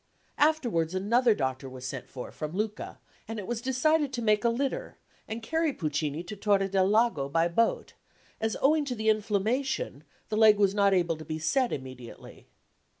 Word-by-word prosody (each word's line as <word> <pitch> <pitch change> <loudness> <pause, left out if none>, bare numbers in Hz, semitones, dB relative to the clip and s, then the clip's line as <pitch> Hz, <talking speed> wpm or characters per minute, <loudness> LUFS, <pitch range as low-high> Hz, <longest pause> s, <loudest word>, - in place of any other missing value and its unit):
Afterwards 235 - +2
another 230 +4 +3
doctor 130 -2 -3
was 130 0 -9
sent 130 -1 -6
for 125 - -8
from 155 0 -6
Lucca, 210 +2 -4 0.3
and 225 +1 -5
it 205 - -5
was 235 +1 -3
decided 285 +3 +1
to 240 - -2
make 215 0 +3
a 235 - +4
litter 275 - -3 0.3
and 225 +1 -6
carry 320 +4 0
Puccini 150 - -2
to 180 +4 -7
Torre 200 -1 +2
del 190 -1 +2
Lago 210 -10 +2
by 165 +3 +2
boat, 225 +7 0 0.5
as 220 -1 -1
owing 300 +2 +4
to 255 -3 -3
the 220 -1 0
inflammation 225 - -1 0.3
the 215 - -1
leg 215 -1 +7
was 200 -1 +3
not 200 -1 +3
able 170 -3 +1
to 155 - -9
be 155 +1 -4
set 250 - +1
immediately. 130 -3 -9
210 Hz, 180 wpm, -28 LUFS, 165-240 Hz, 0.5 s, leg